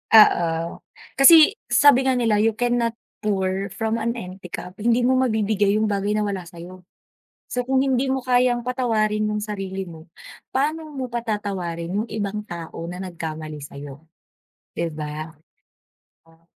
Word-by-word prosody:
Oo, 170 -6 +4 0.4
kasi 325 +9 +8
sabi 270 -2 +5
nga 260 - +3
nila 225 -4 +2
you 220 0 +2
cannot 240 -1 0 0.2
pour 195 -2 -1
from 225 +2 -1
an 235 +1 -1
empty 185 -4 -8
cup. 180 +2 -8
Hindi 235 +3 +2
mo 255 +1 +3
mabibigay 215 -4 +1
yung 215 - +2
bagay 200 +1 0
na 215 - +1
wala 195 -4 -3
sayo. 180 +1 -12 0.6
So, 250 - -2
kung 265 +2 +1
hindi 265 0 +1
mo 265 - +1
kayang 245 -1 +2
patawarin 215 -4 0
yung 210 - -1
sarili 195 -2 -4
mo, 165 -1 -12 0.4
paano 310 +4 -1
mo 270 -3 -4
patatawarin 205 -6 -3
yung 225 - -6
ibang 210 -1 -3
tao 170 -1 -7
na 180 - -6
nagkamali 160 -4 -6
sayo, 145 +2 -10 0.7
di 170 -1 -2
ba? 155 +1 -6 1.0
Ah. 165 0 -25
210 Hz, 150 wpm, -23 LUFS, 180-240 Hz, 1.0 s, kasi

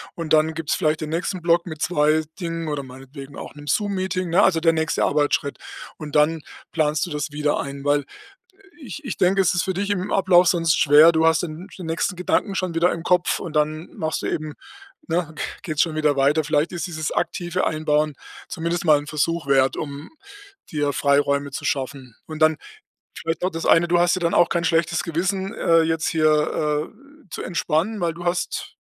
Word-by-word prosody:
und 165 -2 -3
dann 155 +1 +3
gibt's 160 -2 -1
vielleicht 155 -3 0
den 155 - -4
nächsten 180 +2 -2
Block 170 +1 +2
mit 155 -2 -7
2 155 -2 +2 0.2
Dingen 165 -1 -3
oder 145 -2 -3
meinetwegen 135 +2 -11
auch - - -9
'nem 145 0 -12
Zoom-Meeting, 190 -1 -1
ne, 190 +4 +4
also 165 -3 +3
der 165 0 +3
nächste 160 0 0
Arbeitsschritt. 145 0 0 0.4
Und 155 -2 -8
dann 155 +2 +3 0.3
planst 155 0 +1
du 175 - -9
das 150 0 -3
wieder 150 0 0
ein, 140 0 -6
weil 145 0 +2 0.8
ich 295 +3 -8
ich 245 - -4
denke, 185 +2 +2
es 185 -1 +2
ist 175 - +1
für 190 - -2
dich 200 +2 -1
im 200 0 -2
Ablauf 185 -2 +4
sonst 165 -3 +3
schwer. 150 +3 +7
Du 160 0 +2
hast 165 +1 +3
den 170 +2 -6
den 180 - -7
nächsten 165 +3 -1
Gedanken 195 +2 0
schon 185 -2 -2
wieder 170 +2 +3
im 165 - -5
Kopf 180 0 +2
und 160 - -7
dann 155 +2 0
machst 160 -5 -2
du - - -1
eben 155 -1 -4 0.5
ne, 165 -1 -1 0.3
geht's 155 -4 0
schon 160 -2 0
wieder 150 -2 +2
weiter. 145 +3 +3
Vielleicht 150 +1 0
ist 175 - -3
dieses 155 -3 -4
aktive 175 +1 -1
Einbauen 155 -1 0 0.3
zumindest 170 +1 -2
mal 155 -2 +6
'n 145 - -10
Versuch 160 +2 -1
wert, 135 -1 +3
um 145 0 -6 0.6
dir 145 -2 0
Freiräume 140 +1 +1
zu - - -6
schaffen. 130 -3 -3
Und 155 -1 -7
dann 155 -1 +4 0.6
vielleicht 165 0 -3
noch 185 - +1
das 165 0 -5
eine. 170 +1 +5
Du 175 0 +3
hast 175 +1 +3
ja - - -3
dann 170 -1 0
auch 175 - +4
kein 170 - 0
schlechtes 165 0 +1
Gewissen, 190 +3 -2
äh, 165 0 +3
jetzt 160 0 -1
hier, 150 -1 +1
äh, 280 +3 -22
zu - - -5
entspannen, 175 +4 -1
weil 170 -1 0
du 175 +1 -9
hast 175 +1 -2
160 Hz, 200 wpm, -22 LUFS, 150-175 Hz, 0.8 s, schwer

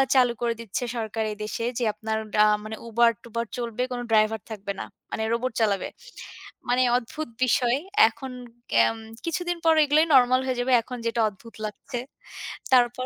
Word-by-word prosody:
চালু 250 -2 +5
করে 235 -1 +1
দিচ্ছে 230 +2 -4
সরকার 220 0 -2
এ - - -5
দেশে 220 +2 -3
যে, 245 - -1
আপনার 220 +1 -3 0.3
আ - - +6 0.2
মানে 215 +1 -5
Uber-ট্যুবর 230 0 +1
চলবে, 235 0 -2
কোনো 245 -1 -3
ড্রাইভার 215 0 +3
থাকবে 200 -2 -4
না, - - -4 0.3
মানে 220 - -2
রোবট 250 +2 -1
চালাবে। 200 -4 +1 0.8
মানে 250 +1 +4
অদ্ভুত 305 +4 -5 0.2
বিষয়, 245 0 +2 0.3
এখন 265 -1 -8 0.4
কেম - - +4 0.3
কিছুদিন 350 +1 -1
পর 325 - +6
এগুলাই 300 +2 +4
নরমাল 255 -1 +6
হয়ে 255 -2 -1
যাবে, 255 +1 +1
এখন 250 +2 -7
যেটা 230 0 0
অদ্ভুত 220 +3 -15
লাগছে। 235 +4 -5 0.7
তারপর 245 0 +4
235 Hz, 160 wpm, -25 LUFS, 220-255 Hz, 0.8 s, আ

